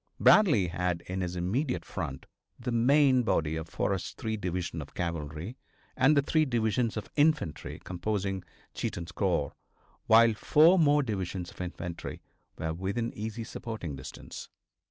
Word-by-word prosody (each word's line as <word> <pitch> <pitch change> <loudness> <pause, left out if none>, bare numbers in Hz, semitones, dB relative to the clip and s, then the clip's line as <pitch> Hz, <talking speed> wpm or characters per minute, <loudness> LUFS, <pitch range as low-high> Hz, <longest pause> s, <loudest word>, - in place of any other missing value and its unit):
Bradley 150 - +6
had 90 0 -1
in 95 +1 -4
his 90 0 -3
immediate 115 - -1
front 65 - -5 0.3
the 125 0 -3
main 130 +2 +4
body 80 -9 0
of 80 0 -5
Forrest's 95 -3 -2
three 110 -1 -3
divisions 90 -4 -3
of 70 - -11
cavalry 85 - -4 0.4
and 145 +3 +4
the 140 - +4
three 155 +2 +3
divisions 115 -3 0
of 110 - -6
infantry 150 - +1
composing 95 +1 -2 0.3
Cheatham's 85 -1 -4
corps, - - 0 0.5
while 115 +1 +7
four 160 - +5
more 150 -2 +4
divisions 95 -6 -3
of - - -10
infantry 90 -1 -5 0.4
were 80 0 -2
within 100 +7 -2
easy 110 +2 -5
supporting 110 - -6
distance. 65 - -9
100 Hz, 140 wpm, -29 LUFS, 85-125 Hz, 0.5 s, while